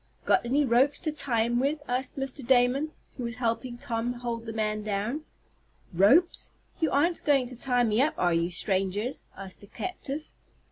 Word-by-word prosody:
"Got - - +4
any 275 +5 +2
ropes 260 +4 +3
to 315 - -1
tie 260 -7 +1
him 240 +1 +1
with?" 290 +3 0
asked 255 +3 -1
Mr. 270 0 -3
Damon, 260 +4 +3 0.3
who 250 - -4
was 235 -1 -3
helping 240 +1 -2
Tom 235 0 -2
hold 235 -1 -5
the - - -3
man 215 -1 -1
down. 215 +9 -2 0.7
"Ropes? 260 - +4 0.3
You 320 - +2
aren't 330 +6 +1
going 275 -4 +3
to 255 - -8
tie 245 0 +1
me 220 +1 +2
up 300 +3 +2
are 175 -1 +2
you, 170 +1 +1
strangers?" 195 +6 -1
asked 190 -1 -8
the 200 - -13
captive. 310 - -5
245 Hz, 180 wpm, -28 LUFS, 220-275 Hz, 0.7 s, Got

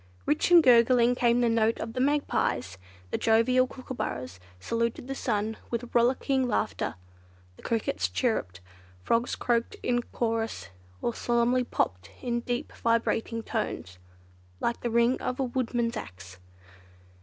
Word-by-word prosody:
Rich 150 - +1
and 345 -2 +8
gurgling 240 -1 +5
came 245 -1 +2
the 240 - +3
note 225 0 +2
of 225 0 -5
the 255 - -3
magpies, 255 - 0 0.3
the - - -1
jovial 250 +3 +3
kookooburras 240 - -5 0.2
saluted 230 - -2
the 270 - -3
sun 220 -4 -2
with 235 0 -4
rollicking 255 +2 +2
laughter, 220 -2 -1 0.6
the - - -17
crickets 155 - -1
chirruped, 95 - -1 0.4
frogs 230 - +1
croaked 235 -1 0
in 245 0 +1
chorus, 225 - -3 0.3
or 235 - 0
solemnly 240 +2 +1
"popped" 90 - -2
in 240 -1 -1
deep 245 +4 -3
vibrating 230 0 0
tones, 95 - -4 0.6
like 235 - -1
the 240 - -1
ring 235 +2 +2
of 255 - -3
a - - +2
woodman's 240 -2 -1
axe. 90 - -9
235 Hz, 135 wpm, -28 LUFS, 220-245 Hz, 0.6 s, and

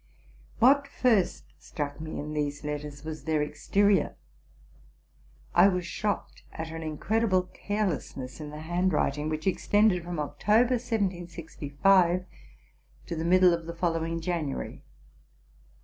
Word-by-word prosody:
What 280 +4 +5
first 225 -9 +1
struck 145 -1 -5
me 160 0 -5
in 150 +1 -5
these 145 -1 -2
letters 150 -1 -5
was 155 0 -6
their 155 -2 +1
exterior: 195 +7 +1 1.4
I - - +7
was 180 -2 0
shocked 205 +4 -3
at 160 0 -6
an 165 0 -6
incredible 185 +5 +1
carelessness 180 -9 -3
in 150 - -6
the 150 +1 -8
handwriting, 160 -3 0
which 155 0 -3
extended 195 -1 +3
from 175 0 -5
October, 210 - +2
1765, 180 - +1 0.8
to 170 - -4
the 160 - -3
middle 180 +1 +5
of 170 -1 -3
the 170 - -6
fol 170 0 +1
lowing 165 0 -2
January. 160 -5 -3
170 Hz, 125 wpm, -28 LUFS, 150-195 Hz, 1.4 s, I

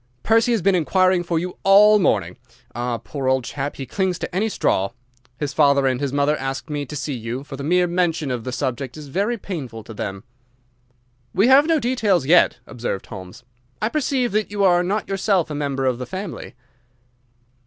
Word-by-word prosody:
"Percy 225 +2 +3
has 225 -7 +1
been 195 - +4
inquiring 185 +1 +2
for 170 -1 -2
you 180 +2 -4
all 210 +2 +6
morning. 95 - +1 0.4
Ah, 120 0 -2
poor 135 +2 -5
old 130 -1 +2
chap, 140 +3 -4
he 135 - -6
clings 185 - -1
to 175 - -6
any 215 +4 +1
straw! 100 - 0 0.5
His 145 -1 -3
father 140 -2 +4
and 130 0 0
his 140 -2 -1
mother 145 +2 +2
asked 135 +3 -5
me 145 -2 -3
to 150 - -7
see 145 +1 -3
you, 120 +2 -5
for 145 - -8
the 140 - -7
mere 180 +4 +3
mention 170 -5 0
of 120 -2 -3
the 130 - -4
subject 130 +2 -3
is 150 -2 -9
very 205 - 0
painful 135 - -6
to 110 - -10
them." 95 -1 -5 1.1
"We 200 +7 +4
have 275 +3 +7
had - - -4
no 325 -2 +3
details 220 - +1
yet," 170 +5 +5
observed 120 -5 -4
Holmes. 95 +2 -10 0.4
"I 215 - 0
perceive 265 -3 0
that 215 +1 0
you 205 -1 -1
are 175 -2 +5
not 195 +4 -1
yourself 195 -4 0
a - - -3
member 140 -2 -2
of 125 -2 0
the 125 - -5
family." 185 - -7
155 Hz, 200 wpm, -21 LUFS, 130-195 Hz, 1.1 s, have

